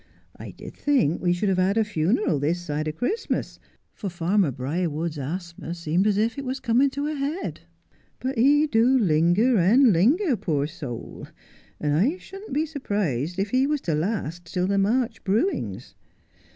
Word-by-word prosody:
' -, -, -38 dB
I -, -, -7 dB
did -, -, -10 dB
think 255 Hz, -, +1 dB
we 175 Hz, -, +2 dB
should 175 Hz, +3 st, 0 dB
have 185 Hz, -1 st, +1 dB
had 190 Hz, +3 st, +2 dB
a 225 Hz, -, +4 dB
funeral 190 Hz, -, 0 dB
this 160 Hz, +5 st, 0 dB
side 155 Hz, -2 st, -3 dB
of 155 Hz, -, -3 dB
Christmas, 425 Hz, -, -2 dB, 0.3 s
for 200 Hz, -, -5 dB
farmer 175 Hz, +1 st, +1 dB
Briarwood's 155 Hz, +4 st, -3 dB
asthma 170 Hz, +3 st, -5 dB
seemed 170 Hz, +4 st, 0 dB
as 205 Hz, -2 st, +2 dB
if 225 Hz, +5 st, 0 dB
it -, -, -4 dB
was 260 Hz, 0 st, -3 dB
coming 250 Hz, +4 st, +3 dB
to 285 Hz, +2 st, -4 dB
a 305 Hz, -, -2 dB
head; 295 Hz, +5 st, -3 dB, 0.6 s
but 260 Hz, +1 st, -3 dB
he 285 Hz, +6 st, +4 dB
do 250 Hz, -1 st, +3 dB
linger 190 Hz, +5 st, +3 dB
and 225 Hz, +6 st, +5 dB
linger, 265 Hz, -, +3 dB
poor 155 Hz, -9 st, -1 dB
soul, 145 Hz, -7 st, -7 dB, 0.5 s
and 150 Hz, -1 st, 0 dB
I 230 Hz, -, +2 dB
shouldn't 390 Hz, +1 st, -11 dB
be 300 Hz, +4 st, +1 dB
surprised 195 Hz, -, -2 dB
if 195 Hz, +1 st, -1 dB
he 260 Hz, +2 st, +3 dB
was 300 Hz, 0 st, 0 dB
to 165 Hz, -, -1 dB
last 170 Hz, -1 st, -3 dB
till 180 Hz, 0 st, 0 dB
the 200 Hz, +1 st, +1 dB
March 225 Hz, +3 st, 0 dB
brewings. 220 Hz, -, -1 dB
200 Hz, 180 wpm, -24 LUFS, 165-260 Hz, 0.6 s, and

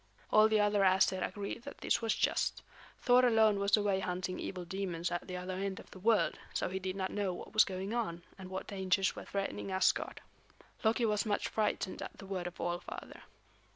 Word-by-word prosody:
All 215 Hz, 0 st, +7 dB
the 215 Hz, -1 st, +3 dB
other 205 Hz, 0 st, +3 dB
Æsir 190 Hz, -1 st, +4 dB
agreed 205 Hz, +3 st, -4 dB
that 280 Hz, +4 st, -9 dB
this -, -, +1 dB
was 225 Hz, -2 st, +1 dB
just. -, -, 0 dB, 0.4 s
Thor 250 Hz, 0 st, +5 dB
alone 220 Hz, -4 st, +5 dB
was 200 Hz, +1 st, +4 dB
away 205 Hz, -2 st, +1 dB
hunting 185 Hz, 0 st, -3 dB
evil 180 Hz, -2 st, -5 dB
demons 175 Hz, -2 st, -3 dB
at 175 Hz, -, -3 dB
the 180 Hz, -1 st, -4 dB
other 180 Hz, +1 st, -4 dB
end 190 Hz, 0 st, -3 dB
of -, -, -14 dB
the -, -, -11 dB
world, 220 Hz, +2 st, +2 dB, 0.2 s
so -, -, 0 dB
he 190 Hz, +1 st, -3 dB
did 185 Hz, 0 st, -3 dB
not 190 Hz, -1 st, -2 dB
know 200 Hz, -3 st, -1 dB
what -, -, -9 dB
was 215 Hz, -, +7 dB
going 190 Hz, +2 st, -4 dB
on, 175 Hz, -8 st, -2 dB
and 190 Hz, -1 st, -9 dB
what 190 Hz, 0 st, -4 dB
dangers 190 Hz, -1 st, +1 dB
were -, -, -8 dB
threatening 195 Hz, 0 st, -3 dB
Asgard. 190 Hz, 0 st, +1 dB, 0.6 s
Loki 230 Hz, +2 st, +3 dB
was 210 Hz, -2 st, +1 dB
much 205 Hz, -, 0 dB
frightened 210 Hz, -3 st, -1 dB
at -, -, -7 dB
the -, -, -10 dB
word 185 Hz, -2 st, -3 dB
of 175 Hz, -, -9 dB
All 175 Hz, 0 st, -1 dB
Father. -, -, -9 dB
195 Hz, 210 wpm, -33 LUFS, 185-210 Hz, 0.6 s, All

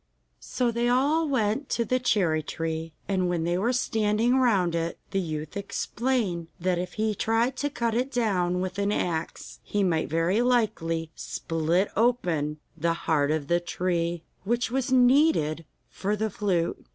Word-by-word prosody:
So 245 Hz, -2 st, -1 dB
they 235 Hz, +1 st, 0 dB
all 290 Hz, +6 st, +2 dB
went 250 Hz, +1 st, 0 dB
to 235 Hz, -, 0 dB
the 255 Hz, +2 st, +1 dB
cherry 190 Hz, -10 st, +2 dB
tree, 160 Hz, 0 st, -4 dB
and 185 Hz, -2 st, +1 dB
when 170 Hz, -2 st, 0 dB
they 175 Hz, +1 st, 0 dB
were 210 Hz, +7 st, +1 dB
standing 225 Hz, -1 st, +1 dB
round 195 Hz, -9 st, +3 dB
it 165 Hz, 0 st, -2 dB
the 195 Hz, -, +1 dB
youth 155 Hz, -4 st, -4 dB
explained 200 Hz, -3 st, -1 dB
that 180 Hz, 0 st, 0 dB
if 180 Hz, 0 st, -4 dB
he 215 Hz, 0 st, 0 dB
tried 225 Hz, +5 st, +1 dB
to 290 Hz, -, -1 dB
cut 235 Hz, -5 st, -1 dB
it 250 Hz, +4 st, 0 dB
down 185 Hz, -7 st, +1 dB
with 185 Hz, +1 st, -3 dB
an 200 Hz, 0 st, +1 dB
axe 165 Hz, -5 st, -3 dB
he 205 Hz, -1 st, -1 dB
might 165 Hz, -4 st, +1 dB
very 165 Hz, +7 st, +2 dB
likely 165 Hz, -10 st, 0 dB
split 165 Hz, +6 st, -1 dB
open 175 Hz, -11 st, +1 dB, 0.2 s
the 165 Hz, +1 st, 0 dB
heart 145 Hz, -3 st, +2 dB
of 155 Hz, -2 st, 0 dB
the 175 Hz, +2 st, +3 dB
tree, 175 Hz, -1 st, -2 dB, 0.2 s
which 235 Hz, +4 st, 0 dB
was 265 Hz, 0 st, -1 dB
needed 250 Hz, -, +4 dB, 0.2 s
for 205 Hz, +2 st, -2 dB
the 215 Hz, 0 st, -2 dB
flute. 180 Hz, -5 st, -1 dB
195 Hz, 165 wpm, -26 LUFS, 165-240 Hz, 0.2 s, needed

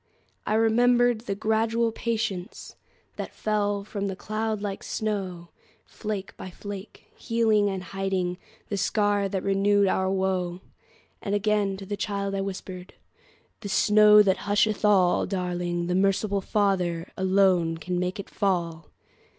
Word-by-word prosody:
I 215 Hz, -, +1 dB
remembered 240 Hz, +1 st, +3 dB
the 200 Hz, -4 st, -3 dB
gradual 225 Hz, +2 st, +1 dB
patienceThat 215 Hz, -6 st, -5 dB
fell 205 Hz, -1 st, -1 dB
from 200 Hz, -1 st, -4 dB
that 190 Hz, -1 st, -4 dB
cloud 215 Hz, +1 st, -2 dB
like 200 Hz, -1 st, -4 dB
snow, 190 Hz, -5 st, -3 dB, 0.4 s
Flake 210 Hz, -3 st, -5 dB
by 185 Hz, -, -7 dB
flake, 200 Hz, +2 st, -9 dB
healing 220 Hz, -3 st, +2 dB
and 190 Hz, -2 st, -4 dB
hidingThe 195 Hz, +2 st, -4 dB
scar 205 Hz, 0 st, +1 dB
that 190 Hz, -1 st, -3 dB
renewed 200 Hz, +1 st, +3 dB
our 190 Hz, 0 st, +1 dB
woe. 190 Hz, -2 st, -1 dB, 0.6 s
And 200 Hz, -, -1 dB
again 205 Hz, -1 st, +1 dB
to 195 Hz, -, -8 dB
the 205 Hz, -, -3 dB
child 200 Hz, 0 st, -3 dB
I 195 Hz, -, -1 dB
whispered,"The 190 Hz, +2 st, -10 dB
snow 210 Hz, +1 st, +6 dB
that 190 Hz, -1 st, +2 dB
husheth 210 Hz, +1 st, +2 dB
all, 190 Hz, -4 st, +4 dB
Darling, 175 Hz, -2 st, -2 dB
the 180 Hz, -, -1 dB
merciful 195 Hz, +1 st, +1 dB
FatherAlone 185 Hz, -2 st, +1 dB
can 180 Hz, +2 st, -2 dB
make 180 Hz, +3 st, -2 dB
it 200 Hz, -, -6 dB
fall!" 170 Hz, -5 st, -2 dB
200 Hz, 125 wpm, -26 LUFS, 185-210 Hz, 0.6 s, snow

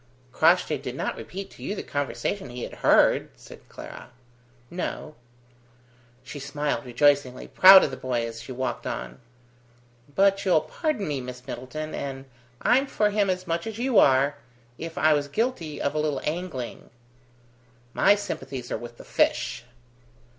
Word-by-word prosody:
"Crossjay -, -, +3 dB
did -, -, -6 dB
not -, -, -2 dB
repeat 195 Hz, +1 st, -8 dB
to -, -, -16 dB
you 205 Hz, -, -3 dB
the -, -, -5 dB
conversation 145 Hz, +5 st, -3 dB
he 120 Hz, 0 st, -6 dB
had -, -, -7 dB
heard?" -, -, +4 dB
said -, -, -15 dB
Clara. -, -, -10 dB, 0.6 s
"No." 175 Hz, -3 st, -4 dB, 1.1 s
She 145 Hz, -, -8 dB
smiled 145 Hz, 0 st, -2 dB
rejoicingly, 130 Hz, +1 st, +2 dB
proud 190 Hz, 0 st, +9 dB
of 145 Hz, -, 0 dB
the -, -, -6 dB
boy, 120 Hz, -2 st, -1 dB
as 115 Hz, 0 st, -7 dB
she 130 Hz, -, -9 dB
walked 130 Hz, +1 st, -3 dB
on. 65 Hz, +1 st, -5 dB, 1.0 s
"But 195 Hz, 0 st, +3 dB
you'll 180 Hz, -5 st, +4 dB
pardon 215 Hz, -, -2 dB
me, 145 Hz, -3 st, -2 dB
Miss 125 Hz, 0 st, -9 dB
Middleton 155 Hz, +5 st, -6 dB
and 135 Hz, -1 st, -5 dB, 0.4 s
I'm 265 Hz, +3 st, +4 dB
for 210 Hz, -5 st, +1 dB
him 205 Hz, -1 st, +1 dB
as 185 Hz, 0 st, -1 dB
much 170 Hz, +3 st, -2 dB
as 220 Hz, -1 st, -5 dB
you 245 Hz, -1 st, +3 dB
are 140 Hz, +2 st, +4 dB, 0.4 s
if 165 Hz, -1 st, -7 dB
I 155 Hz, +2 st, +4 dB
was 145 Hz, -1 st, 0 dB
guilty 175 Hz, -, -2 dB
of 140 Hz, -, -1 dB
a 155 Hz, -, -1 dB
little 150 Hz, -3 st, 0 dB
angling." 155 Hz, -6 st, -4 dB, 1.0 s
"My 200 Hz, -, +5 dB
sympathies 135 Hz, -10 st, -6 dB
are -, -, -2 dB
with 120 Hz, 0 st, -10 dB
the -, -, -12 dB
fish." -, -, 0 dB
150 Hz, 160 wpm, -26 LUFS, 130-190 Hz, 1.1 s, proud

